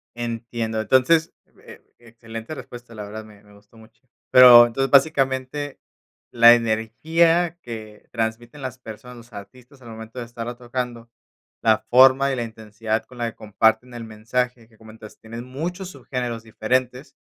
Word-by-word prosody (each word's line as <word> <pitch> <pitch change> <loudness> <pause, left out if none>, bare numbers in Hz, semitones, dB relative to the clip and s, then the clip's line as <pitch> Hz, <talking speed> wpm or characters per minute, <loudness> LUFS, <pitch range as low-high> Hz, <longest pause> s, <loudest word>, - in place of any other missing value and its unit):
Entiendo. 115 -1 -4
Entonces, 160 +8 +2 0.3
eh, - - -13 0.2
excelente 115 +2 -10
respuesta, 120 -4 -11
la 105 - -7
verdad, 110 +2 -8
me 105 -1 -18
me 105 0 -20
gustó 100 +2 -22
mucho. 110 +1 -20 0.3
Pero, 125 -2 +9
entonces, 135 +3 -2
básicamente, 135 0 +1 0.5
la 120 0 +8
energía 160 +10 +1
que 110 -4 -10
transmiten 115 +4 -4
las 130 -1 -6
personas, 125 +1 -11
los 120 0 -16
artistas 125 +7 -13
al 120 - -12
momento 110 +2 -9
de 120 - -5
estarla 120 0 -7
tocando, 120 -1 -6 0.5
la 110 -1 +3
forma 130 +2 +5
y - - -1
la 120 - -3
intensidad 110 0 -4
con 125 - -16
la 120 -1 -2
que - - -28
comparten 110 +3 0
el 120 -1 -7
mensaje 115 +2 -3
que 110 - -25
comentas, 110 -1 -14
tienen 115 +1 -9
muchos 175 +8 -6
subgéneros 125 -4 -5
diferentes. 125 +4 -2
120 Hz, 155 wpm, -22 LUFS, 110-130 Hz, 0.5 s, Pero